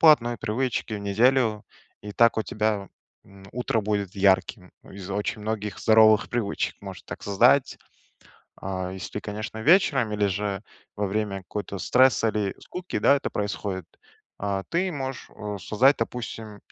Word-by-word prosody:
платные 120 Hz, -7 st, +5 dB
привычки 115 Hz, 0 st, -2 dB
в 105 Hz, -, -3 dB
неделю, 110 Hz, +2 st, +2 dB, 0.4 s
и 105 Hz, -, -7 dB
так 115 Hz, +3 st, +4 dB
у 110 Hz, -, +1 dB
тебя, 105 Hz, -3 st, -1 dB, 0.4 s
м, 100 Hz, 0 st, -16 dB
утро 120 Hz, -2 st, 0 dB
будет 100 Hz, -2 st, -2 dB
ярким 95 Hz, -1 st, +2 dB
из 95 Hz, -1 st, -10 dB
очень 105 Hz, +2 st, -2 dB
многих 105 Hz, -1 st, -3 dB
здоровых 110 Hz, -1 st, +5 dB
привычек 115 Hz, -4 st, -2 dB
может 95 Hz, -4 st, -9 dB
так -, -, -8 dB
создать. 120 Hz, +7 st, +3 dB, 0.8 s
А, 95 Hz, -1 st, -3 dB
если 95 Hz, 0 st, -7 dB
ты, 105 Hz, -, -3 dB
конечно, 110 Hz, +2 st, -6 dB
вечером 135 Hz, -, +3 dB
или 105 Hz, -1 st, +1 dB
же 100 Hz, 0 st, -2 dB, 0.4 s
во 105 Hz, 0 st, -1 dB
время 100 Hz, 0 st, -2 dB
какого-то 100 Hz, +1 st, -5 dB
стресса 125 Hz, +1 st, +4 dB
или 105 Hz, -2 st, -1 dB
скуки, 180 Hz, 0 st, -5 dB
да, -, -, +5 dB
это 140 Hz, -, -3 dB
происходит, 100 Hz, -3 st, -3 dB, 0.5 s
а, 100 Hz, -1 st, -2 dB
ты 180 Hz, +2 st, +1 dB
можешь, 135 Hz, -4 st, -5 dB
а, 105 Hz, -1 st, -5 dB
создать, 125 Hz, +9 st, +3 dB
допустим, 115 Hz, -2 st, -5 dB
105 Hz, 150 wpm, -25 LUFS, 100-120 Hz, 0.8 s, платные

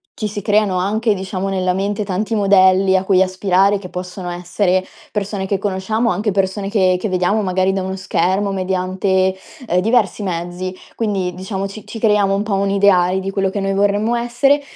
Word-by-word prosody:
ci 215 Hz, -, -3 dB
si 205 Hz, -1 st, -6 dB
creano 205 Hz, -2 st, +2 dB
anche, 210 Hz, +4 st, +1 dB
diciamo, 190 Hz, 0 st, -4 dB
nella 185 Hz, -1 st, 0 dB
mente 200 Hz, +3 st, -1 dB
tanti 205 Hz, +4 st, -2 dB
modelli 190 Hz, -2 st, +4 dB
a 190 Hz, -, +2 dB
cui 190 Hz, -1 st, +4 dB
aspirare 190 Hz, +1 st, +2 dB
che 185 Hz, -2 st, -9 dB
possono 180 Hz, 0 st, -6 dB
essere 180 Hz, +2 st, 0 dB, 0.3 s
persone 200 Hz, -1 st, -3 dB
che 200 Hz, -, 0 dB
conosciamo, 205 Hz, +4 st, -1 dB
anche 205 Hz, +4 st, -1 dB
persone 195 Hz, +1 st, -1 dB
che 185 Hz, -4 st, +2 dB
che 215 Hz, -, -2 dB
vediamo 185 Hz, +4 st, +1 dB
magari 185 Hz, 0 st, +1 dB
da 195 Hz, -, -1 dB
uno 190 Hz, +1 st, -3 dB
schermo 190 Hz, +1 st, 0 dB
mediante, 190 Hz, 0 st, 0 dB, 0.3 s
ehm, 180 Hz, -4 st, +1 dB
diversi 220 Hz, -1 st, +1 dB
mezzi. 175 Hz, 0 st, -4 dB, 0.2 s
Quindi, 195 Hz, -5 st, -2 dB
diciamo, 190 Hz, +2 st, -4 dB
ci 195 Hz, +2 st, -10 dB
ci -, -, -7 dB
creiamo 210 Hz, -3 st, +2 dB
un 200 Hz, -, -1 dB
po' 210 Hz, -1 st, -3 dB
un 195 Hz, 0 st, +1 dB
ideale 190 Hz, -2 st, +3 dB
di 195 Hz, +1 st, -4 dB
quello 195 Hz, -1 st, 0 dB
che 200 Hz, -, -3 dB
noi 195 Hz, 0 st, -1 dB
vorremmo 205 Hz, +3 st, +1 dB
essere, 240 Hz, +5 st, +2 dB
195 Hz, 185 wpm, -18 LUFS, 185-205 Hz, 0.3 s, modelli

